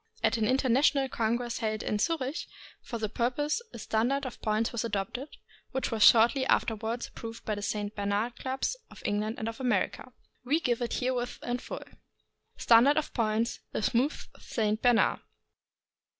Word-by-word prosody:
At - - +3
an 220 -1 +1
international 270 +2 +3
congress 235 +1 -1
held 215 -1 -2
in 210 - -1
Zurich 310 +2 -1 0.3
for 235 - -5
the 220 -1 -1
pur 235 +3 0
pose, 295 - -1
a - - -9
standard 245 +6 0
of 255 - -7
points 215 +1 0
was 235 -1 -2
adopted, 230 +6 -3 0.4
which 265 0 -1
was 225 -1 -2
shortly 235 +5 +7
afterward 225 +2 0
approved 230 0 -9
by 215 - -1
the 205 - -4
St. 205 0 -3
Bernard 205 +4 -1
clubs 265 - -2
of - - -14
England 210 +2 -1
and 220 - -3
of 225 +2 -5
America. 250 0 -1 0.3
We 285 +6 +2
give 245 -6 0
it 240 - -2
herewith 245 -1 -1
in 245 +1 -2
full. - - -7 0.7
STANDARD 240 +6 +6
OF 310 - -1
POINTS 225 0 0
— - - -50
THE - - -2
SMOOTH 255 +8 0
ST. 215 -1 -1
BERNARD. 245 -2 +4
235 Hz, 170 wpm, -29 LUFS, 220-255 Hz, 0.7 s, shortly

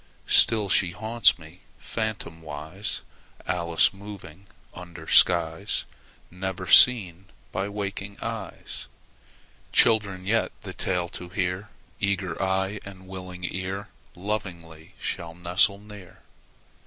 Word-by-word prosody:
Still 110 -3 +5
she 90 -1 +3
haunts 110 0 +3
me, 80 +1 -14 0.2
phantomwise, 80 -5 -5 0.4
Alice 85 0 +2
moving 100 -3 -11 0.3
under 85 -3 -10
skies 85 +2 +3 0.5
Never 90 0 -4
seen 95 -6 +6 0.3
by 95 +1 -2
waking 100 0 -5
eyes. 115 -5 -6 0.8
Children 100 -5 +3
yet, 110 +3 +1
the - - -6
tale 90 -2 -1
to 90 - -7
hear, 90 +2 -2 0.3
Eager 100 -4 -1
eye 95 +1 0
and 95 -1 -11
willing 90 -1 -8
ear, 95 +3 -4 0.3
Lovingly 85 -5 -5
shall 85 -1 -4
nestle 90 +3 +3
near. 105 -2 -13
95 Hz, 105 wpm, -26 LUFS, 90-100 Hz, 0.8 s, seen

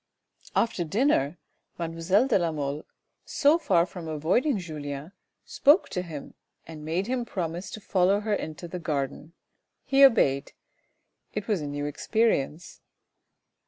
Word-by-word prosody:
After 225 -6 +1
dinner 170 - +1 0.4
mademoiselle 170 +7 +1
de 235 - +3
la 170 -2 0
Mole, 145 0 -4 0.4
so 300 +3 +3
far 175 - +3
from 175 -2 -9
avoiding 180 - +1
Julien, 150 -3 -6 0.3
spoke 295 +7 +4
to 180 - -2
him 160 -5 -8 0.3
and 155 -2 -10
made 165 +5 -1
him 250 +1 -1
promise 175 -4 -4
to - - -7
follow 195 0 +2
her 215 0 -1
into 160 -3 -4
the 180 +2 -6
garden. 150 0 -3 0.5
He 275 0 +4
obeyed. 140 - +4 0.8
It 210 -1 -3
was 205 -7 0
a 145 - -4
new 145 0 -3
experience. 170 -1 -1
175 Hz, 135 wpm, -27 LUFS, 155-210 Hz, 0.8 s, spoke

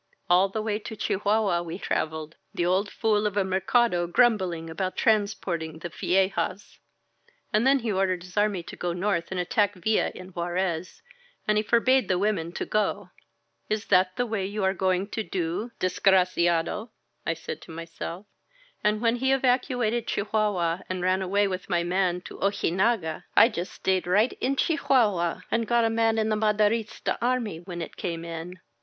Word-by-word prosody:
All 185 +2 +5
the 215 +2 -3
way 215 -1 -1
to 220 +1 -7
Chihuahua 205 -3 +1
we 170 0 -6
traveled, 160 -4 -3 0.2
the 175 - 0
old 190 +3 +1
fool 210 -1 +1
of 205 0 -4
a 200 - +3
Mercado 190 0 +2
grumbling 185 -6 +2
about 185 +3 -3
transporting 190 -7 0
the 170 +2 -6
viejas* 190 +2 -1 0.7
And 215 +4 +3
then 275 +1 +5
he 230 -4 -2
ordered 185 -2 0
his 180 0 -13
army 205 -4 +1
to 170 - -9
go 175 -1 -2
north 175 -2 -1
and 190 - -3
attack 205 +1 +1
Villa 210 +4 +1
in 185 0 -9
Juarez, 175 - -3 0.4
and 210 - +3
he 210 - +3
forbade 235 +3 +3
the 185 - +1
women 185 -4 0
to - - -3
go. 215 0 -1 0.6
Is 215 0 -1
that 185 -1 +4
the 245 - 0
way 220 -4 -2
you 200 +2 -3
are 190 0 +2
going 185 0 0
to 220 - -2
do, 185 +3 -3
desgra 185 0 +3
ciado? 175 +5 0 0.3
I 165 - -1
said - - -7
to - - -12
myself. 165 +3 -7 0.6
And 210 0 +2
when 230 +1 +3
he 265 +2 +1
evacuated 250 -3 +1
Chi - - -1
huahua 200 -5 0
and 185 -1 -3
ran 185 +1 +2
away 200 +2 +2
with 185 0 -5
my 170 -1 +1
man 180 0 0
to - - -11
Ojinaga, 190 -3 0
I 230 - +8
just 185 -5 -4
stayed 185 -2 -1
right 210 +7 +3
in 270 +2 +1
Chihuahua 230 - +2
and 230 -1 +1
got 235 0 +3
a 225 - +1
man 225 0 +2
in 220 0 +1
the 215 - +2
Ma 210 0 +2
derista 210 +1 0
army 235 -8 0
when 175 -1 -6
it - - -9
came 170 -1 -4
in. 170 +2 -7
195 Hz, 180 wpm, -26 LUFS, 175-215 Hz, 0.7 s, I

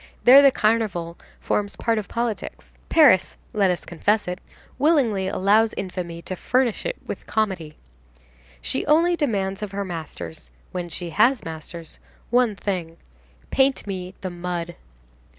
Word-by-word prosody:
There 265 +3 +9
the 280 - +7
Carnival 210 -8 0 0.2
forms 205 0 -1
part 225 -1 0
of 210 - -6
politics. 235 -2 -4 0.2
Paris,—let 210 - +4
us 180 - -2
confess 205 +5 0
it—willingly 225 - 0
allows 210 +4 +3
infamy 175 -3 -5
to 185 - -5
furnish 250 - 0
it - - -2
with - - -7
comedy. 190 -8 -2 0.9
She - - 0
only 335 +4 +4
demands 200 - -1
of 205 -2 -5
her 200 0 -2
masters—when 145 - -7
she 170 0 -5
has 235 +6 +3
masters—one 170 +8 -3
thing: 180 -5 -4 0.5
"Paint 270 0 +2
me 185 -2 -5
the 185 - -4
mud." 175 -1 -4
195 Hz, 125 wpm, -23 LUFS, 175-230 Hz, 0.9 s, There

